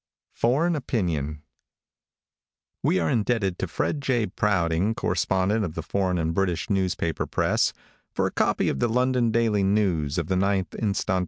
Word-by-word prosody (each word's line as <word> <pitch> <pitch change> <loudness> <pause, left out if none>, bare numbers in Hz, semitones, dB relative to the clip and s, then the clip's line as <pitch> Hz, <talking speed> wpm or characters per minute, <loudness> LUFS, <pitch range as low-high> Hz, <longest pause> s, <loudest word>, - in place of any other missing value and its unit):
FOREIGN 155 +9 +2
OPINION 80 - -2 1.4
|WE 95 - +2
are 80 - 0
indebted 105 -5 0
to 95 - -1
Fred 145 - -2
J. 125 -5 +1
Prouting, 95 0 0
correspondent 95 +3 0
of 85 -5 -4
the 80 - -4
foreign 95 +1 0
and 80 -1 -1
British 90 0 -1
newspaper 90 -4 -1
press, - - +1 0.4
for - - 0
a - - -1
copy - - +1
of 70 - -1
the 120 - +1
London 125 0 +2
Daily 110 -2 +2
of 90 -6 +1
the 95 - -1
9th 95 -2 0
inst. 100 -3 -2
95 Hz, 150 wpm, -25 LUFS, 85-115 Hz, 1.4 s, FOREIGN